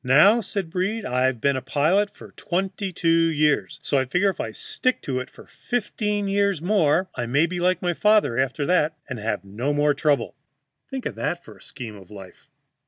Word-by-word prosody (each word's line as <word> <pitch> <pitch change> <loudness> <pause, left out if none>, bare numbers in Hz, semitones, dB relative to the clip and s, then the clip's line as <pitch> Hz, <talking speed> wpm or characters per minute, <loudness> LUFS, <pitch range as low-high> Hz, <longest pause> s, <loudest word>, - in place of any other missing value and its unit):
"Now," 155 - +6
said 190 -4 -4
Breed, 195 +5 -1
"I've 125 0 +1
been 140 +3 +2
a 130 - -2
pilot 165 - +2
for - - -12
twenty 190 +2 -3
two 170 -1 -3 0.2
years, 150 -1 +1
so 140 - +1
I 130 - 0
figure 180 +9 +2
if - - -15
I - - -2
stick 435 - -2
to 130 -2 -2
it 130 - -6
fifteen 210 -3 -3
years 200 -2 +1
more 175 -1 +2
I 120 -2 -3
may 140 +7 +3
be 175 +1 -4
like 180 0 +1
my 175 -1 +1
father 210 - +3
after 135 +2 0
that, 160 -3 +2
and 130 -4 -5
have 105 -3 -3
no 120 +9 -2
more 145 0 +3
trouble." 145 0 0 0.5
Think 265 -2 -5
of - - -2
that 175 0 -3
for - - -12
a - - -20
scheme 115 -6 -8
of 95 -1 -15
life! 95 -3 -12
160 Hz, 200 wpm, -24 LUFS, 130-200 Hz, 0.5 s, Now